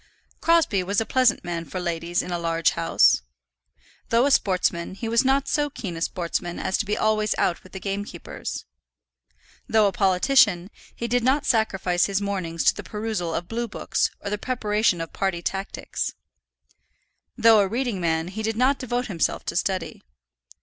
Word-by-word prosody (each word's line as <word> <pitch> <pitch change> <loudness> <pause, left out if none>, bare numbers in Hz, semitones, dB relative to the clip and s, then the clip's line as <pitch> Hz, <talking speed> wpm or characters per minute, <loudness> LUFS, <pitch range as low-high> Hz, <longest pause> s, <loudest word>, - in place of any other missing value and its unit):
Crosbie 330 - +3
was 200 +4 0
a 225 - -1
pleasant 255 -2 +2
man 170 -1 -3
for 165 +4 -6
ladies 170 0 -1
in 180 - -7
a 175 - -1
large 165 -1 +1
house. 165 - +3 0.9
Though 235 +3 +4
a 285 - +2
sportsman, 185 -5 +1
he 225 +3 -5
was 230 +2 +3
not 270 +1 +2
so 295 -1 +1
keen 195 -10 -6
a 165 - -7
sportsman 175 0 -2
as 190 - -1
to - - 0
be 210 +1 0
always 215 -1 +1
out 175 - 0
with 185 - -17
the 190 - -5
gamekeepers. 200 +2 -5 1.0
Though 220 -1 +4
a 200 - +3
politician, 195 0 +3 0.2
he 235 - -3
did 245 +1 +1
not 275 +4 +2
sacrifice 195 -7 +1
his 200 -1 0
mornings 185 -5 -2
to - - +5
the - - -7
perusal 210 -6 -3
of 170 - -3
blue 235 +3 -3
books 215 - -1
or 200 - -5
the 210 - -2
preparation 210 -7 0
of 165 - -6
party 180 -3 -1
tactics. 195 +2 -3 1.2
Though 225 -2 +6
a 200 - +3
reading 230 -2 -2
man, 165 0 0
he 210 +4 -5
did 220 0 -2
not 265 +3 +3
devote 245 0 -2
himself 180 -8 -1
to - - -3
study. 190 +1 -2
200 Hz, 175 wpm, -24 LUFS, 175-230 Hz, 1.2 s, Though